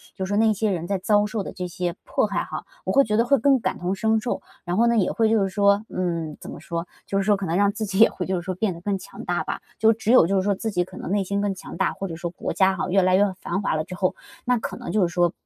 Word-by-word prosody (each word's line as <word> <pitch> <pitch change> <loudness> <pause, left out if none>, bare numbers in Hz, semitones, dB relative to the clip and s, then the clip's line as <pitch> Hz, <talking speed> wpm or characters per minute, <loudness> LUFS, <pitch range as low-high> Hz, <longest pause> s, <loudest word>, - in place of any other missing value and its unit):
就 190 - -3
是 - - -7
说 205 - +1
那 220 0 +4
些 215 +1 0
人 170 -3 -2
在 195 - 0
遭 205 +2 +2
受 215 0 -3
的 - - -6
这 180 -1 -4
些 175 0 -3
迫 - - +1
害 - - -1
哈， - - -6 0.2
我 - - 0
会 275 - +5
觉 210 -3 -1
得 230 - +4
会 275 +3 +4
更 270 +2 +4
感 - - -2
同 180 +2 -1
身 220 +2 +2
受。 240 - -2 0.2
然 175 0 -1
后 235 +2 +4
呢， 235 0 +3
也 195 - +2
会 225 -1 +2
就 220 -1 +3
是 195 - 0
说， 200 +1 +3
嗯， 170 -4 -2
怎 - - -8
么 - - -8
说？ 170 +1 -4 0.2
就 195 - -1
是 - - +1
说 205 +1 +3
可 195 - -4
能 165 - -1
让 200 0 +3
自 215 +1 -4
己 195 -1 -2
也 225 - +8
会， 180 - -5
就 190 - -1
是 - - -3
说 185 +2 -3
变 195 0 0
得 170 - -11
更 200 +1 -1
强 - - -10
大 175 0 -1
吧， - - -4 0.2
就 220 +1 +6
只 220 0 -1
有 250 -9 +7
就 195 - +1
是 190 - +3
说 200 +1 +2
自 220 - -3
己 180 -3 +1
可 175 - -12
能 - - -5
内 200 0 +2
心 200 +2 -2
更 205 -1 0
强 - - -9
大， - - +1
或 195 - -5
者 165 - -6
说 175 +1 -4
国 - - -4
家 190 0 +3
哈， 190 - -2
越 195 +2 +4
来 185 0 +4
越 195 - +5 0.2
繁 190 +3 -2
华 195 - 0
了 155 - 0
之 185 - -9
后， 185 0 0 0.3
那 250 0 +3
可 225 - -5
能 - - -6
就 215 - +2
是 180 - +4
说 175 -1 +3
195 Hz, 355 characters per minute, -24 LUFS, 180-215 Hz, 0.3 s, 也